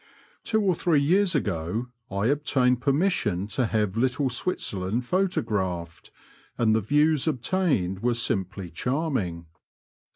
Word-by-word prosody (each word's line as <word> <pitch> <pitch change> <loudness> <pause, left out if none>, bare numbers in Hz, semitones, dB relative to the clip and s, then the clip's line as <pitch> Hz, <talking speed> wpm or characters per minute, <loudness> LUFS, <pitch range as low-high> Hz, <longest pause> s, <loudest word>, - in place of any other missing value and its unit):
Two 220 -1 +1
or 190 -2 +3
three 165 -2 +2
years 180 +5 +3
ago 105 - -2 0.2
I 100 -1 -1
obtained 130 -2 +2
permission 135 - +1
to 115 +3 0
have 105 -3 0
Little 130 +3 +1
Switzerland 115 - -2
photographed, 100 - -2 0.5
and 110 -2 +3
the 110 - +2
views 150 +5 +2
obtained 135 - 0
were 120 +2 +1
simply 95 -5 -2
charming. 125 - -2
125 Hz, 120 wpm, -26 LUFS, 100-150 Hz, 0.5 s, or